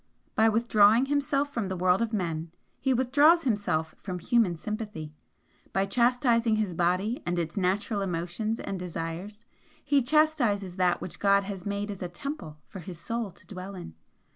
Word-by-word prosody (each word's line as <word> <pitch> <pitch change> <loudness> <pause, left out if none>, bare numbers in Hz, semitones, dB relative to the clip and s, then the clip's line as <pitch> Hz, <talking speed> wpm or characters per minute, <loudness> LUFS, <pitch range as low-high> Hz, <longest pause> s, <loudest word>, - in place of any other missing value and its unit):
By 220 +1 +4
withdrawing 220 +1 +4
himself 285 0 0
from 225 -5 -1
the 190 -1 -3
world 180 +3 +3
of 230 -1 0
men 165 -6 -2 0.3
he 265 - +1
withdraws 285 +7 +4
himself 205 - 0
from 185 -3 -5
human 205 -1 +2
sympathy. 210 -5 -5 0.6
By 195 0 +2
chastising 235 +1 +2
the 215 -4 -1
body 185 +7 0
and 175 0 -2
its 170 -1 -2
natural 200 +2 0
emotions 185 +5 -2
and 195 - -4
desires, 180 +5 -6 0.4
he 285 -1 +3
chastises 245 - +2
that 180 -1 +2
which 185 - -7
God 200 0 +4
has 195 -1 -6
made 200 +1 -2
as 200 - -8
a 180 - -3
temple 175 - -6
for 190 - -9
his 175 0 -8
soul 230 +4 -3
to - - -19
dwell 195 0 -8
in. 175 - -8
205 Hz, 165 wpm, -28 LUFS, 180-235 Hz, 0.6 s, By